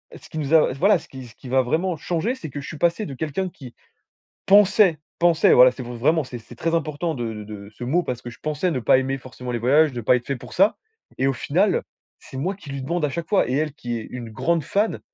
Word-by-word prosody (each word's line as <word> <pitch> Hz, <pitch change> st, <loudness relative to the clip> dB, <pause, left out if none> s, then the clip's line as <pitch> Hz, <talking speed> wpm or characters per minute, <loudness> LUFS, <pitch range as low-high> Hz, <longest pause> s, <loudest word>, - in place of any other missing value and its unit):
ce -, -, -14 dB
qui 160 Hz, -, -8 dB
nous 150 Hz, +1 st, -2 dB
a 155 Hz, -5 st, +5 dB
voilà 195 Hz, +7 st, +3 dB
ce -, -, -16 dB
qui 130 Hz, -1 st, -10 dB
ce 115 Hz, -, -17 dB
qui 125 Hz, -, -11 dB
va 130 Hz, +1 st, +3 dB
vraiment 165 Hz, +7 st, -1 dB
changer 175 Hz, -, -2 dB
c'est 160 Hz, -12 st, -8 dB
que 145 Hz, +1 st, -6 dB
je -, -, -9 dB
suis 155 Hz, -, -7 dB
passé 170 Hz, +7 st, +1 dB
de 140 Hz, -, -7 dB
quelqu'un 160 Hz, +6 st, -3 dB
qui, 130 Hz, -8 st, -12 dB, 0.7 s
pensait 200 Hz, -3 st, +5 dB, 0.2 s
pensait 170 Hz, -2 st, +4 dB
voilà 125 Hz, +1 st, +8 dB
c'est 130 Hz, -, -8 dB
v 120 Hz, 0 st, -7 dB
vraiment 155 Hz, +6 st, +2 dB
c'est 125 Hz, -1 st, -8 dB
c'est 120 Hz, +2 st, -14 dB
très 165 Hz, +7 st, -1 dB
important 160 Hz, +1 st, -2 dB
de 115 Hz, -3 st, -4 dB
de 100 Hz, -1 st, -9 dB
ce 120 Hz, -, -9 dB
mot 165 Hz, +8 st, +1 dB
parce 125 Hz, -4 st, -4 dB
que 120 Hz, -, -7 dB
je 120 Hz, -, -15 dB
pensais 155 Hz, +4 st, -1 dB
ne 130 Hz, -, -1 dB
pas 120 Hz, +2 st, +4 dB
aimer 135 Hz, +1 st, -1 dB
forcément 125 Hz, -1 st, -8 dB
les 120 Hz, -, -1 dB
voyages 145 Hz, +5 st, +4 dB
de 120 Hz, -, -4 dB
pas 125 Hz, -, +4 dB
être 120 Hz, -, -10 dB
fait 140 Hz, -, -1 dB
pour 125 Hz, -, -11 dB
ça 195 Hz, +4 st, +3 dB, 0.4 s
et 135 Hz, -, +2 dB
au 135 Hz, -, +2 dB
final, 120 Hz, -, +1 dB, 0.4 s
c'est 130 Hz, -, -10 dB
moi 185 Hz, +8 st, -2 dB
qui 185 Hz, -7 st, -13 dB
lui 140 Hz, -1 st, -4 dB
demande 170 Hz, +3 st, -1 dB
à 145 Hz, -, -1 dB
chaque 165 Hz, +3 st, -5 dB
fois 200 Hz, -, +3 dB
et -, -, -1 dB
elle 150 Hz, +1 st, 0 dB
qui 120 Hz, -5 st, -4 dB
est 110 Hz, -, -9 dB
une 120 Hz, -2 st, -7 dB
grande 165 Hz, +8 st, 0 dB
fan. 205 Hz, +9 st, 0 dB
145 Hz, 270 wpm, -23 LUFS, 125-170 Hz, 0.7 s, voilà